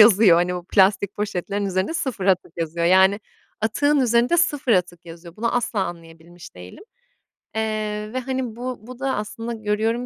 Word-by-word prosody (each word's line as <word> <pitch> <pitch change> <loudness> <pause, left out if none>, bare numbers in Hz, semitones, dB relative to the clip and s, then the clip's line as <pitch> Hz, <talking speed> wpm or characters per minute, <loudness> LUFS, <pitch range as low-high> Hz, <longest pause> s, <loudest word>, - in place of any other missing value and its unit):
yazıyor. 210 -5 +7
Hani, 175 +1 +1
o 175 -1 -6
plastik 200 +1 +2
poşetlerin 200 0 -2
üzerinde 190 - -1
sıfır 250 - -3
atık 185 -4 +1
yazıyor 170 +1 -2
yani 190 +3 +5 0.4
atığın 285 +7 +2
üzerinde 245 +6 +3
sıfır 290 -8 +2
atık 175 -2 -1
yazıyor. 170 +1 -12
Bunu 230 +2 -1
asla 240 -3 -1
anlayabilmiş 170 0 -11
değilim, 90 - -12 0.7
eee, 215 -1 -3
ve 255 - -1
hani 255 -3 -3
bu 250 +1 -5
bu 255 0 -10
da 270 -1 -1
aslında 225 +3 -5
görüyorum 220 +2 -1
210 Hz, 160 wpm, -22 LUFS, 180-235 Hz, 0.7 s, yazıyor